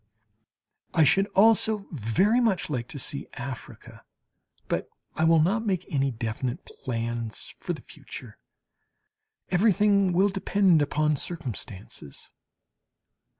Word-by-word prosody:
I 160 - +6
should 195 +7 +4
also 215 0 +4
very 165 - +2
much 215 -9 +1
like 120 -4 -2
to 160 - -8
see 140 +2 -4
Africa. 130 -1 -8 0.6
But - - -2 0.3
I 160 - +2
will 165 0 +6
not 195 +8 +2
make 185 -5 -1
any 135 -1 +2
definite 115 +1 -4
plans 115 -2 -4
for - - -3
the - - -9
future. - - -10 1.1
Everything 200 0 +3
will 190 +3 +3
depend 195 -3 +3
upon 150 +1 +1
circumstances. 115 - -7
160 Hz, 110 wpm, -27 LUFS, 125-195 Hz, 1.1 s, I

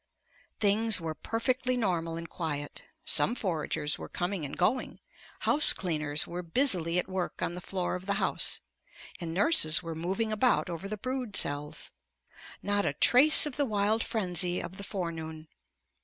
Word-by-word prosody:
Things 215 0 +3
were 165 -2 -4
perfectly 250 +7 -1
normal 170 -7 -1
and 165 0 -7
quiet. 145 -4 -4 0.2
Some 160 +10 +1
foragers 160 -7 -2
were - - -8
coming 175 -2 -3
and 140 - -7
going; 225 +9 0 0.4
house 300 +1 +5
cleaners 155 -4 -1
were 175 +1 -6
busily 175 - +1
at 180 - 0
work 185 -1 -4
on - - -2
the 180 - -7
floor 185 0 -3
of 185 +1 -6
the 200 - 0
house, 210 - 0 0.6
and 170 -2 -5
nurses 180 - +4
were 165 -1 -5
moving 190 +7 -2
about 215 -3 +1
over 170 +4 -6
the 215 - -4
brood 255 -1 -4
cells. 145 +1 +1 0.7
Not 205 0 +1
a 140 - -1
trace 275 - +6
of 295 -4 -5
the 290 - +2
wild 215 -1 +1
frenzy 180 -4 +1
of 185 +2 -8
the 200 - -7
forenoon. 165 -5 -5
185 Hz, 160 wpm, -29 LUFS, 165-220 Hz, 0.7 s, trace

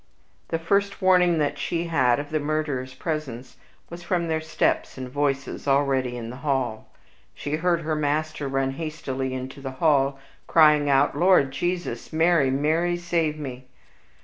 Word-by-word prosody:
The 165 - -1
first 200 +4 0
warning 180 -2 +4
that 145 -1 -1
she 170 +3 -1
had 140 -7 +2
of 145 +1 -6
the 155 - +1
murderers' 145 -4 -2
presence 130 -5 -5 0.3
was 170 +1 -8
from 175 -1 -1
their 160 0 0
steps 160 - -1
and 130 -1 -5
voices 140 +1 -2
already 135 -3 +1
in 115 -1 -6
the 125 - -9
hall. 135 -6 -2 0.5
She 145 +1 -3
heard 170 0 +1
her 155 -1 -1
master 150 0 -1
run 135 0 0
hastily 135 -3 -4
into 130 +2 -7
the 135 -1 -5
hall, 140 -3 +2 0.3
crying 150 -2 +5
out, 140 +1 +3
"Lord 170 -4 +4
Jesus! 175 -4 -3
Mary, 160 -3 +3
Mary, 160 +6 +1
save 170 -3 -1
me!" 130 -4 -7
145 Hz, 155 wpm, -24 LUFS, 135-165 Hz, 0.5 s, crying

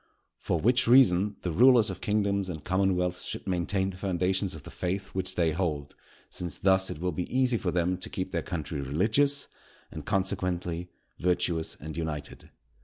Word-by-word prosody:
For 85 - -1
which 125 +6 +3
reason, 105 -6 +5
the 90 - -1
rulers 120 +3 +5
of 95 - -8
kingdoms 100 -2 0
and 80 -4 -6
commonwealths 90 -1 0
should - - -5
maintain 95 +1 0
the 90 - -11
foundations 95 0 0
of 80 - -10
the - - -10
faith 95 +2 -3
which 95 -1 -4
they 85 -2 +2
hold; 75 -4 -2 0.3
since 85 -3 -5
thus 95 0 +3
it - - -5
will 90 +1 -1
be 90 +2 -4
easy 130 -2 +2
for 95 - -2
them 90 +1 0
to - - -5
keep 95 0 -4
their 85 - -1
country 75 -3 -4
religious, 110 - +1 0.4
and, - - -7
consequently, 90 -3 -1 0.3
virtuous 85 -2 0
and 80 +1 -7
united. 75 -3 -5
90 Hz, 175 wpm, -28 LUFS, 85-100 Hz, 0.4 s, reason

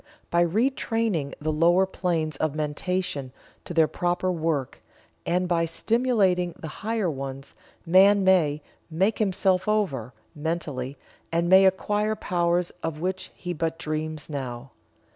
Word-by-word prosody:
By 170 0 +4
retraining 220 - 0
the 155 +1 -1
lower 170 +4 +4
planes 165 -5 -2
of 155 0 -1
mentation 150 -2 -2 0.3
to - - -8
their 160 -2 +5
proper 175 +2 -1
work, 160 -6 -2 0.5
and 180 +1 +1
by 170 -1 +2
stimulating 190 -2 +1
the 160 - -7
higher 220 -2 0
ones, 135 -2 -5 0.3
man 195 +3 +6
may 155 -6 +3 0.3
"make 190 +7 +1
himself 190 -2 +1
over." 150 - 0 0.2
mentally, 150 -4 -3 0.3
and 170 +1 +1
may 190 +2 +7
acquire 210 +3 +1
powers 175 -3 0
of 160 -2 -4
which 185 +2 -3
he 180 -1 -5
but 165 0 -2
dreams 155 -2 -4
now. 130 -3 -6
170 Hz, 130 wpm, -25 LUFS, 155-190 Hz, 0.5 s, may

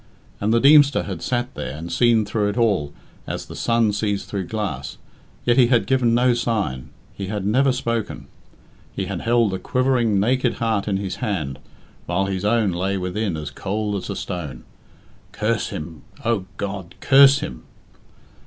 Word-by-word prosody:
And 105 +2 0
the 115 - +4
Deemster 145 +1 +6
had - - -6
sat 125 +1 -2
there 65 - -5
and 85 +2 -7
seen 115 -3 +3
through 105 0 0
it 105 - -4
all 100 -11 +1 0.4
as - - -4
the - - -10
sun 115 -3 +2
sees 100 -1 -1
through 100 -3 -4
glass, 90 -12 -4 0.5
yet 120 -1 +3
he 125 -2 +6
had 120 -1 +3
given 125 -3 +2
no 125 +1 +4
sign, 110 - -2 0.2
he 100 - -6
had 100 -1 -3
never 130 +6 +3
spoken; 115 -4 -3 0.7
he 95 - -2
had 95 -2 -4
held 115 -3 +2
a 95 - -2
quivering, 125 -3 +1
naked 125 +4 +1
heart 110 -3 -1
in 100 -2 +1
his 95 -2 -4
hand, 90 - -3 0.5
while 90 +3 0
his 95 -1 -3
own 105 -2 +2
lay 95 +3 -1
within 90 0 -2
as 75 -2 -6
cold 105 +6 -3
as 95 0 -5
a 100 - -3
stone. 75 -12 -5 0.7
Curse 110 -1 -1
him, 80 -1 -7 0.2
O 115 -5 +1
God! 100 -3 -5
Curse 140 +1 +6
him! 60 - -6
105 Hz, 170 wpm, -22 LUFS, 95-120 Hz, 0.7 s, Deemster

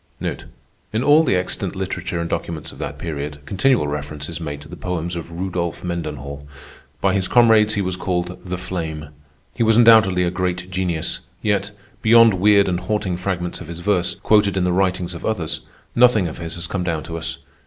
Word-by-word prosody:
In 110 +3 0
all 150 +3 +6
the 125 -11 +2
extant 90 +1 -2
literature 90 -2 -3
and 85 - -2
documents 80 -2 -4
of - - -14
that - - -5
period, 75 -2 -5
continual 115 - +2
reference 75 0 -5
is 85 0 -6
made 75 -3 -4
to 75 - -11
the 90 - -9
poems 85 -1 -3
of 85 0 -6
Rudolph 85 -1 -3
Mendenhall. 75 -5 -5 0.5
By 95 -1 +3
his 95 -2 +1
comrades 110 -3 +5
he 100 - 0
was 90 0 -2
called 90 -1 -2
"The 90 -1 -4
Flame." 80 -4 -5 0.4
He - - -6
was 110 -1 +4
undoubtedly 110 -6 +6
a 85 - 0
great 90 0 -2
genius; 90 -4 -1 0.2
yet, 100 -2 +1 0.3
beyond 115 0 +7
weird 100 0 +5
and 90 -1 0
haunting 105 -4 -1
fragments 90 -1 -3
of - - -8
his 85 +1 -7
verse, 90 -2 +1
quoted 105 -2 +3
in 95 - +2
the 90 0 +1
writings 90 -1 0
of 85 - -8
others, 90 -8 -2 0.3
nothing 120 -6 +5
of 80 - -7
his 80 -1 -4
has 85 -1 -4
come 90 +2 -2
down 85 -3 -2
to 85 - -7
us. 80 0 -4
90 Hz, 195 wpm, -21 LUFS, 85-100 Hz, 0.5 s, beyond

